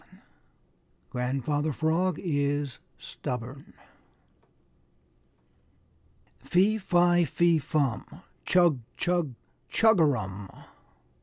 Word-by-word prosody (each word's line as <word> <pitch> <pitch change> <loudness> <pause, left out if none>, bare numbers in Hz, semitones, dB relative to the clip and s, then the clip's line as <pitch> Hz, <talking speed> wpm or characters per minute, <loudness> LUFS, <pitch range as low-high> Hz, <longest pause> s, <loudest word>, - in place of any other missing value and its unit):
XI - - -18 0.9
GRANDFATHER 140 +4 -1
FROG 165 +4 0
IS 145 - -1 0.2
STUBBORN 125 +3 -7 2.6
"Fee, 200 +5 +2
fi, 175 -2 +3
fe, 170 +1 +2
fum! 140 -6 -1 0.4
Chug, 175 -7 +3 0.2
chug, 175 -6 0 0.3
chugarum!" 125 - +2
150 Hz, 65 wpm, -27 LUFS, 130-175 Hz, 2.6 s, fi